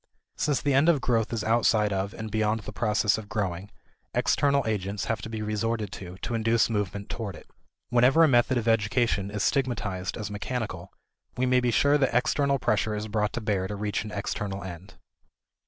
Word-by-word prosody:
Since 145 -2 0
the 145 - +2
end 140 +5 +4
of 160 -4 +4
growth 115 -4 0
is 115 -3 -2
outside 110 -2 +2
of 95 +1 -1
and 110 -1 -6
beyond 110 +1 +1
the - - -8
process 105 -2 +1
of 105 -2 -10
growing, 100 -3 -3 0.5
external 140 -1 +2
agents 100 -2 -2
have 110 -3 -2
to 110 - -6
be 110 -1 -4
resorted 105 -1 -2
to 90 -1 -8
to 120 - -3
induce 115 0 +2
movement 100 -1 -2
toward 105 -6 -5
it. - - -14 0.4
Whenever 125 +6 +5
a - - +7
method 120 -1 +3
of 115 -1 -2
education 110 -2 +1
is 105 0 -2
stigmatized 105 -9 -1
as 105 -3 -5
mechanical, 105 -4 -4 0.5
we 130 - +1
may 125 0 +4
be 125 -1 +1
sure 145 +5 +3
that 135 -4 +1
external 140 +3 +2
pressure 110 -3 0
is 105 +1 -4
brought 105 0 -1
to 120 - -3
bear 100 -3 0
to 105 - -5
reach 105 +1 -2
an 110 - -7
external 100 -1 -4
end. 95 +2 -9
110 Hz, 195 wpm, -27 LUFS, 100-120 Hz, 0.5 s, a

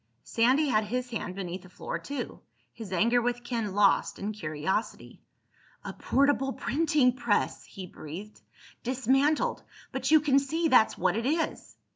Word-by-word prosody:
Sandy 255 +6 +2
had 215 -3 +2
his 250 +3 -3
hand 185 -5 -4
beneath 185 -1 -5
the 185 - -15
floor 180 - -5
too, 285 0 -6 0.3
his 220 -5 -9
anger 235 +6 +3
with 245 0 -2
Ken 230 -5 -3
lost 200 -1 +3
in 205 +2 -3
curiosity. 160 +1 -3 0.6
"A - - -5
portable 270 -1 +1
printing 290 -4 +2
press!" 235 -4 0
he 190 - -9
breathed. 180 +5 -10 0.4
"Dismantled—but 265 +1 -1
you 315 0 +7
can 280 -2 +3
see 320 +4 -1
that's 220 -5 +4
what - - +1
it 230 +3 -1
is!" 320 +3 -2
240 Hz, 145 wpm, -28 LUFS, 205-270 Hz, 0.6 s, you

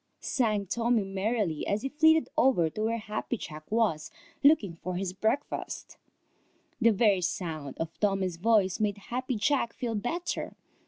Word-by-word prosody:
sang 215 -6 0
Tommy 230 +2 +1
merrily, 195 -3 -1
as 205 +2 0
he 270 - -1
flitted 315 +2 +4
over 175 -12 +3
to 215 - -5
where 225 +1 0
Happy 215 +2 -3
Jack 155 -5 -9
was 215 -9 +1 0.3
looking 250 - +4
for 180 +2 -4
his 185 0 -2
breakfast. 220 +8 -2 0.9
The 230 - +6
very 205 -3 +3
sound 160 -5 -3
of 165 0 -5
Tommy's 195 -4 0
voice 195 -1 +2
made 210 -2 0
Happy 250 +5 -3
Jack 235 +2 +1
feel 240 -2 -3
better. 285 - -3
210 Hz, 150 wpm, -29 LUFS, 185-235 Hz, 0.9 s, The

